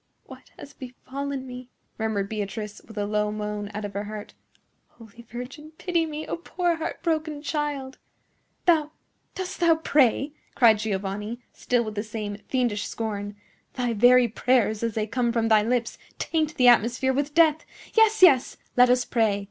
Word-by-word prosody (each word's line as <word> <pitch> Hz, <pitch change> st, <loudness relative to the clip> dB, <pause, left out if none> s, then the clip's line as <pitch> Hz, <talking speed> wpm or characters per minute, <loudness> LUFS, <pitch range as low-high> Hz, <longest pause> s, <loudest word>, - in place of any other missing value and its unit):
"What -, -, -14 dB
has 285 Hz, -, -11 dB
befallen 265 Hz, +2 st, -6 dB
me?" 250 Hz, 0 st, -9 dB, 0.3 s
murmured 215 Hz, -3 st, -1 dB
Beatrice, 210 Hz, 0 st, -5 dB
with 220 Hz, -, -13 dB
a 205 Hz, -, 0 dB
low 210 Hz, 0 st, 0 dB
moan 210 Hz, -1 st, -4 dB
out 210 Hz, 0 st, -5 dB
of 205 Hz, -, -6 dB
her 200 Hz, +1 st, -3 dB
heart. 210 Hz, 0 st, -8 dB, 0.5 s
"Holy 230 Hz, 0 st, -15 dB
Virgin, 265 Hz, +6 st, -8 dB
pity 340 Hz, -3 st, 0 dB
me, 310 Hz, 0 st, -5 dB
a -, -, -3 dB
poor 345 Hz, 0 st, -1 dB
heart 325 Hz, -, -5 dB
broken 310 Hz, -3 st, -1 dB
child!" 290 Hz, -4 st, -3 dB, 0.7 s
"Thou,—dost 340 Hz, +3 st, -2 dB
thou 335 Hz, -2 st, +5 dB
pray?" 285 Hz, -3 st, +2 dB, 0.2 s
cried 225 Hz, -4 st, +5 dB
Giovanni, 210 Hz, +3 st, -3 dB
still 245 Hz, -1 st, 0 dB
with 215 Hz, -1 st, -5 dB
the 205 Hz, -, -2 dB
same 210 Hz, -2 st, -5 dB
fiendish 240 Hz, -6 st, 0 dB
scorn. 205 Hz, -2 st, -4 dB, 0.4 s
"Thy 245 Hz, -2 st, -1 dB
very 245 Hz, +3 st, +6 dB
prayers, 220 Hz, -2 st, +1 dB
as 230 Hz, -2 st, -2 dB
they 215 Hz, -1 st, 0 dB
come 235 Hz, +2 st, 0 dB
from 230 Hz, -1 st, 0 dB
thy 215 Hz, -1 st, +6 dB
lips, 235 Hz, +1 st, -1 dB, 0.2 s
taint 315 Hz, -1 st, -1 dB
the 250 Hz, -, +4 dB
atmosphere 240 Hz, +2 st, +4 dB
with 285 Hz, +2 st, -2 dB
death. 320 Hz, -2 st, +4 dB, 0.3 s
Yes, 445 Hz, -2 st, +4 dB
yes; 275 Hz, -9 st, +6 dB, 0.2 s
let 250 Hz, 0 st, +6 dB
us 250 Hz, 0 st, +3 dB
pray! 220 Hz, -4 st, +1 dB
245 Hz, 165 wpm, -25 LUFS, 215-290 Hz, 0.7 s, very